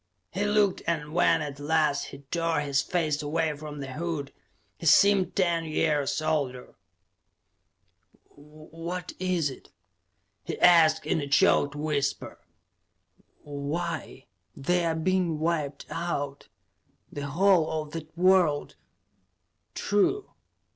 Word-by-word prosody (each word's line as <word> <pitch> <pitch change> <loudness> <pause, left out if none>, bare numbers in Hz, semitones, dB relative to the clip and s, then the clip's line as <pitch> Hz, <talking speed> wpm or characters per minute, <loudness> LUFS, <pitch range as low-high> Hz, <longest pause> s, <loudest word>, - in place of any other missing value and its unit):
He 200 +4 -1
looked, 205 -2 +2
and 155 -2 -2
when 165 -2 +3
at 145 -1 -7
last 150 -1 +1
he 140 +1 -11
tore 165 -3 0
his 140 -2 +1
face 155 -1 -1
away 155 +1 -1
from 150 -1 -8
the 135 -1 -6
hood, 155 -2 -4 0.5
he 165 - -3
seemed 195 +1 +5
ten 170 -3 +1
years 155 -1 0
older. 135 -5 -2 1.6
"What 160 +4 -8
is 180 -6 0
it?" - - -13 0.7
he - - -5
asked 160 -3 +5
in 160 - 0
a 140 - -4
choked 140 +1 +3
whisper. 145 -2 -2 1.0
"Why 150 +2 -5 0.3
they're 170 +2 0
being 175 0 0
wiped 150 -3 -2
out; 145 -5 -4 0.6
the 145 0 -5
whole 175 +2 +3
of 150 - -14
that 160 0 -8
world 180 -5 +3 0.5
" 90 -1 -50
"True. 295 - 0
155 Hz, 115 wpm, -27 LUFS, 145-170 Hz, 1.6 s, seemed